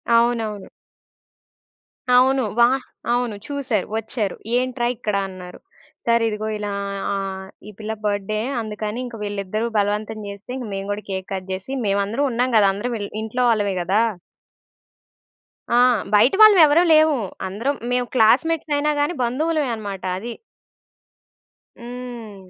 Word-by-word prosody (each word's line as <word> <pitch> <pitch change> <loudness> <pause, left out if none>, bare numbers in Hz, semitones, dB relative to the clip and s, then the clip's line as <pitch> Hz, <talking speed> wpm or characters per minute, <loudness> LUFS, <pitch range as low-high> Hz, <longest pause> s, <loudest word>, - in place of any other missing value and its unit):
అవునవును. 230 -4 +1 1.4
అవును. 260 +1 +5 0.2
వా 235 0 +7 0.4
అవును 240 -3 0
చూసారు 265 -9 -1
వచ్చారు 220 -3 -2 0.2
ఏంట్రా 250 -1 0
ఇక్కడ 215 -3 -2
అన్నారు? 180 -1 -10 0.5
సార్ 235 0 +4
ఇదిగో 215 0 -3
ఇలా 205 -1 -4 0.4
ఆహ్, 195 -1 -4 0.2
ఈ 210 - -8
పిల్ల 220 0 -3
బర్త్ 205 -2 -1
డే. 215 - 0 0.2
అందుకని 215 +1 -4
ఇంక 245 -2 -8
వీళ్ళిద్దరూ 205 +2 -2
బలవంతం 210 +2 -1
జేస్తే 200 +3 -9
ఇంగ 250 -3 -5
మేము 195 +1 -4
గూడా 205 +1 -4
కేక్ 190 -1 -4
కట్ 190 -1 -5
జేసి 190 +7 -5
మేమందరం 200 +7 +1
ఉన్నాం 250 +2 0
గదా 200 -2 +5
అందరం 235 +5 -3
వెల్ 205 -1 -5
ఇంట్లో 220 +3 -1
వాళ్ళమే 205 -3 +1
గదా! 190 +5 +2 1.7
ఆ! - - +3 0.4
బయట 215 +5 +5
వాళ్ళుమేవరం 350 -6 +7
లేవు. 310 -1 +5 0.3
అందరం 230 +10 -2 0.2
మేం 250 0 +1
క్లాస్‌మేట్స్ 295 +7 +3
అయినా 300 +1 +1
గాని, 290 +4 +1
బంధువులమే 295 +4 0
అన్నమాట 200 -3 -6
అది. 235 +5 -5 1.5
హ్మ్. 235 -5 -9
220 Hz, 130 wpm, -22 LUFS, 205-250 Hz, 1.7 s, వా